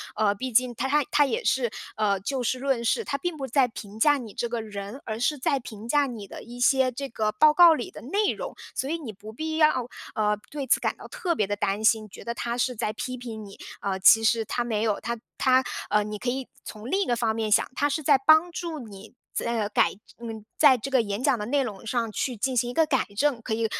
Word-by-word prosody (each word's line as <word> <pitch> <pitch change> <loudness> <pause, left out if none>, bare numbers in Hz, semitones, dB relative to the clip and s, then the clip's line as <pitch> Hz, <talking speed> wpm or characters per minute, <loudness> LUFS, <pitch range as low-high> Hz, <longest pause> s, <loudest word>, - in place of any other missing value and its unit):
呃， 210 -1 +2
毕 255 +5 -5
竟 250 +2 +3
他 245 +3 -2
他 295 +2 +3
他 290 - +5
也 260 - -2
是， 240 0 +1 0.3
呃， 205 -2 +2
就 265 +6 -2
事 245 +2 0
论 260 -3 -1
事， 455 - +1
他 280 - -2
并 350 +3 -3
不 275 -3 -4
在 260 +1 +3
评 215 -2 -10
价 290 +5 +5
你 230 -6 -8
这 240 - -2
个 235 -1 -3
人， 205 +4 -7
而 220 0 -5
是 295 +5 +1
在 280 +1 0
评 220 -3 -10
价 290 +1 +3
你 235 -6 -6
的 - - -10
一 240 +1 -10
些 260 +1 +4
这 275 +3 -5
个 215 -2 -1
报 300 +9 +5
告 345 +1 +8
里 320 - -4
的 - - -10
内 400 - +1
容。 - - -6 0.2
所 260 +3 -2
以 330 - -1
你 285 -9 -7
不 205 +2 -11
必 315 +6 -3
要， 280 -6 +3 0.3
呃， 210 -1 +1
对 285 -2 -4
此 - - +4
感 - - -1
到 - - -11
特 345 -3 -2
别 210 -8 0
地 205 - -1
担 200 +1 -1
心， 220 0 +3
觉 - - -11
得 235 - -3
他 235 0 -3
是 250 0 0
在 215 -1 -2
批 255 +3 -5
评 230 -3 -7
你。 195 - -12 0.2
呃， 195 -1 -2
其 225 +4 +7
实 225 0 +2
他 240 +3 -1
没 220 -3 -1
有， 215 -3 0
他 235 0 -3 0.2
他 260 0 +4 0.3
呃， 210 - +3
你 210 0 -5
可 245 - -2
以 260 +1 -3 0.2
从 215 +3 -8
另 390 +5 +1
一 - - +1
个 240 - +1
方 225 -2 0
面 220 -1 -2
想， - - +4
他 290 - +1
是 305 +2 -2
在 280 0 +5
帮 315 +5 +5
助 335 -3 -5
你 210 -4 -11 0.2
在， 235 - -2
呃， 205 - -1
改 - - +2 0.3
嗯， 225 -2 -7
在 280 -4 +7
这 260 +4 -6
个 260 -2 +4
演 205 +2 -4
讲 275 -3 +3
的 210 - -3
内 280 +2 +2
容 215 -4 -7
上 230 -1 -1
去 250 +4 -2
进 260 +5 -1
行 240 0 +1
一 - - -5
个 320 +4 +4
改 275 -4 +1
正。 275 -1 +1
可 220 - -3
以， 225 +1 0
240 Hz, 280 characters per minute, -26 LUFS, 220-275 Hz, 0.3 s, 告